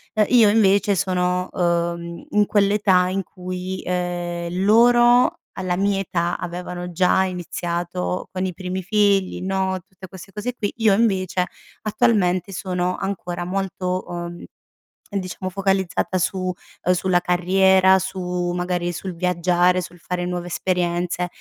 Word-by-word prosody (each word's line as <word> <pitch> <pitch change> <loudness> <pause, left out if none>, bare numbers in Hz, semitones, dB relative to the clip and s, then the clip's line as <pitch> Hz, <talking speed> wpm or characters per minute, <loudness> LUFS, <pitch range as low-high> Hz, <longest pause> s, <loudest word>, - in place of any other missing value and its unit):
Uhm, 215 -1 +4
io 230 -4 +6
invece 205 -1 +3
sono, 180 0 0
uhm, 170 -1 -1
in 210 0 +4
quell'età 200 -3 +3
in 195 +1 -1
cui 185 +1 -6
ehm, 175 0 -2
loro, 240 +3 +5 0.2
alla 185 -2 -1
mia 195 0 +1
età 175 -2 -1
avevano 180 0 -6
già 180 +2 +3
iniziato 175 0 -3
con 185 0 -2
i 185 - -3
primi 185 +2 -4
figli, 200 -2 +2
no, 190 0 -1
tutte 190 0 -12
queste 190 +2 -12
cose 225 +4 -3
qui, 205 -4 -3
io 220 -3 +4
invece 190 -4 +1 0.4
attualmente 200 -4 +1
sono 180 -1 -2
ancora 180 -3 -4
molto, 185 -1 -2
uhm, 175 0 -6 0.7
diciamo 185 -1 -3
focalizzata 190 -1 0
su 185 +2 0 0.5
uhm, 180 - +3
sulla 180 0 +2
carriera, 190 +2 +4
su 180 -1 -3
magari 175 -1 -1
sul 185 +2 -5
viaggiare, 180 +1 +2
sul 175 -1 -10
fare 180 +1 -3
nuove 175 0 -3
esperienze, 175 0 -1
185 Hz, 130 wpm, -22 LUFS, 175-195 Hz, 0.7 s, io